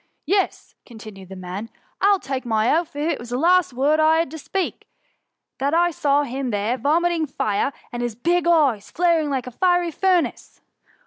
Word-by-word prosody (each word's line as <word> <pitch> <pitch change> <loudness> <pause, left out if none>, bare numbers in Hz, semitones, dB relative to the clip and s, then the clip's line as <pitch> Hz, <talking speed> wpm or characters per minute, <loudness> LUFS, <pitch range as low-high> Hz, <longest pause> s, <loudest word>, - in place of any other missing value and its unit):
'^ - - -42 0.2
Yes," 390 0 -1
continued 215 -5 -12
the 190 - -8
man; 185 +4 -6
^' - - -34 0.3
1 400 - +5
11 390 - -1
take 270 -1 -4
my 225 +1 +2
oath, 330 -3 -2
if 300 +3 0
it - - -3
was 240 - -9
the 245 - -2
last 355 +3 +3
word 280 +5 +1
I 315 +1 +4
had 330 -4 0
to 320 - -7
speak, 375 +5 -4 0.7
that 280 +4 0
I 345 +1 +3
saw 290 -2 +1
him 265 -1 -4
there 210 +2 -1
vomiting 325 +4 +1
fire, 215 -1 -1 0.2
and 240 - -4
his 240 -2 -3
big 340 +8 0
eyes 285 -11 +2
flaring 335 -3 +1
like 265 -3 -2
a 250 - -7
fiery 355 +4 +1
furnace." 365 +1 -1
290 Hz, 200 wpm, -22 LUFS, 240-340 Hz, 0.7 s, 1